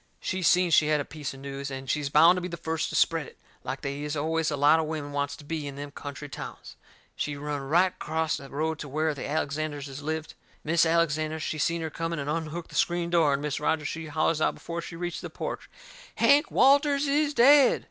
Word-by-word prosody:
She 190 Hz, -1 st, -3 dB
seen 180 Hz, +1 st, +4 dB
she 150 Hz, -1 st, +5 dB
had 150 Hz, -1 st, +2 dB
a 145 Hz, -, -3 dB
piece 150 Hz, -3 st, -6 dB
of 135 Hz, -, -12 dB
news, 140 Hz, 0 st, -5 dB
and 135 Hz, 0 st, -7 dB
she's 145 Hz, +1 st, -1 dB
bound 165 Hz, +5 st, +6 dB
to -, -, -2 dB
be 180 Hz, -, -3 dB
the 170 Hz, -1 st, -6 dB
first 160 Hz, -1 st, -2 dB
to -, -, -5 dB
spread 165 Hz, -4 st, +2 dB
it, -, -, -16 dB, 0.3 s
like 130 Hz, +1 st, -5 dB
they 140 Hz, 0 st, -4 dB
is 150 Hz, +1 st, -3 dB
always 160 Hz, +2 st, 0 dB
a 145 Hz, -, -2 dB
lot 145 Hz, +3 st, +5 dB
of 160 Hz, -, -1 dB
women 150 Hz, -2 st, -4 dB
wants 145 Hz, 0 st, -2 dB
to 150 Hz, -, -14 dB
be 150 Hz, 0 st, -4 dB
in 140 Hz, -, -7 dB
them 145 Hz, 0 st, -7 dB
country 145 Hz, +1 st, -7 dB
towns. -, -, -9 dB, 0.4 s
She 145 Hz, -, -3 dB
run 145 Hz, 0 st, -4 dB
right 175 Hz, +7 st, +2 dB
acrost 160 Hz, -1 st, -2 dB
the 140 Hz, -, -11 dB
road 160 Hz, +2 st, -2 dB
to 145 Hz, -, -6 dB
where 155 Hz, +2 st, 0 dB
the 140 Hz, -, -6 dB
Alexanderses 145 Hz, -2 st, -3 dB
lived. 155 Hz, +1 st, -4 dB, 0.3 s
Mis' 165 Hz, +1 st, +3 dB
Alexander, 160 Hz, -1 st, +1 dB
she 155 Hz, 0 st, -3 dB
seen 170 Hz, +2 st, 0 dB
her 160 Hz, -1 st, -4 dB
coming 165 Hz, +1 st, -3 dB
and 145 Hz, 0 st, -2 dB
unhooked 165 Hz, +1 st, -4 dB
the -, -, -11 dB
screen 170 Hz, 0 st, +1 dB
door, 165 Hz, -4 st, +4 dB
and 140 Hz, +1 st, -2 dB
Mis' 150 Hz, -2 st, -2 dB
Rogers 150 Hz, 0 st, 0 dB
she 160 Hz, -1 st, -5 dB
hollers 155 Hz, +1 st, 0 dB
out -, -, +2 dB
before 170 Hz, 0 st, -5 dB
she 165 Hz, -, -8 dB
reached 175 Hz, 0 st, -4 dB
the -, -, -6 dB
porch: -, -, -6 dB, 0.5 s
"Hank 290 Hz, +2 st, +4 dB
Walters 280 Hz, +1 st, +4 dB
is 295 Hz, +1 st, +1 dB
dead." 275 Hz, +2 st, +6 dB
155 Hz, 235 wpm, -27 LUFS, 145-170 Hz, 0.5 s, bound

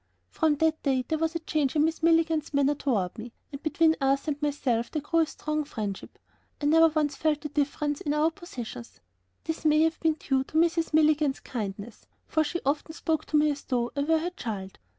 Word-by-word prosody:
From 315 Hz, -2 st, +2 dB
that 315 Hz, +1 st, +1 dB
day 260 Hz, -3 st, 0 dB
there 315 Hz, -, -1 dB
was 325 Hz, +1 st, -1 dB
a -, -, 0 dB
change 295 Hz, -3 st, 0 dB
in 300 Hz, -, +4 dB
Mrs. 320 Hz, +1 st, 0 dB
Milligan's 325 Hz, -2 st, +2 dB
manner 280 Hz, +1 st, +3 dB
toward 220 Hz, -11 st, -1 dB
me, 235 Hz, +2 st, -8 dB, 0.2 s
and 280 Hz, 0 st, -7 dB
between 320 Hz, 0 st, +3 dB
Arthur 275 Hz, +3 st, +1 dB
and 290 Hz, +1 st, -5 dB
myself 265 Hz, -5 st, 0 dB
there 310 Hz, -, -2 dB
grew 330 Hz, +3 st, 0 dB
a 325 Hz, -, +4 dB
strong 305 Hz, 0 st, -3 dB
friendship. 210 Hz, -8 st, -6 dB, 0.4 s
I 290 Hz, -, -3 dB
never 325 Hz, +2 st, +6 dB
once 300 Hz, -3 st, 0 dB
felt 300 Hz, 0 st, 0 dB
the 300 Hz, -, -5 dB
difference 290 Hz, 0 st, -1 dB
in 295 Hz, 0 st, -1 dB
our 310 Hz, +2 st, +3 dB
positions; 240 Hz, -, -9 dB, 0.4 s
this 320 Hz, 0 st, -4 dB
may 305 Hz, 0 st, +4 dB
have 325 Hz, 0 st, 0 dB
been 320 Hz, -1 st, +2 dB
due 270 Hz, -3 st, 0 dB
to 310 Hz, -, -4 dB
Mrs. 330 Hz, 0 st, +2 dB
Milligan's 305 Hz, -2 st, +3 dB
kindness, 210 Hz, -2 st, -6 dB, 0.2 s
for 315 Hz, -, +1 dB
she 345 Hz, +3 st, -3 dB
often 295 Hz, +3 st, -1 dB
spoke 320 Hz, -2 st, -1 dB
to 305 Hz, -, +1 dB
me 300 Hz, 0 st, +4 dB
as 285 Hz, -1 st, -5 dB
though 240 Hz, -2 st, -1 dB
I 285 Hz, -, 0 dB
were 320 Hz, +3 st, +3 dB
her 340 Hz, +3 st, -2 dB
child. 205 Hz, -, -6 dB
300 Hz, 210 wpm, -27 LUFS, 270-320 Hz, 0.4 s, never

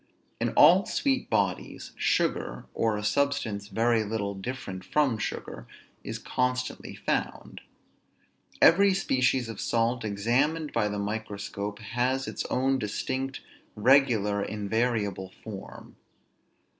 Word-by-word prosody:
In -, -, +1 dB
all 175 Hz, +6 st, +7 dB
sweet 270 Hz, -2 st, 0 dB
bodies, 95 Hz, -3 st, -1 dB
sugar, -, -, 0 dB
or 110 Hz, -2 st, +1 dB
a 105 Hz, -, -5 dB
substance 110 Hz, -5 st, 0 dB
very 115 Hz, +1 st, +2 dB
little 100 Hz, -1 st, -2 dB
different 100 Hz, -2 st, -6 dB
from 135 Hz, -5 st, +1 dB
sugar, -, -, -5 dB, 0.4 s
is -, -, -4 dB
constantly 125 Hz, 0 st, -2 dB
found. -, -, -3 dB, 1.0 s
Every 195 Hz, +3 st, +6 dB
species 130 Hz, -8 st, +1 dB
of 115 Hz, -3 st, -6 dB
salt, 115 Hz, +1 st, 0 dB
examined 125 Hz, +10 st, 0 dB
by 110 Hz, -2 st, +2 dB
the 105 Hz, 0 st, -3 dB
microscope, 100 Hz, -1 st, -4 dB
has 125 Hz, +4 st, -1 dB
its -, -, -4 dB
own 135 Hz, +1 st, +1 dB
distinct, 130 Hz, +5 st, -3 dB, 0.3 s
regular, 110 Hz, -4 st, +3 dB
invariable 105 Hz, -2 st, -1 dB
form. 100 Hz, -3 st, -9 dB
115 Hz, 110 wpm, -28 LUFS, 105-130 Hz, 1.0 s, all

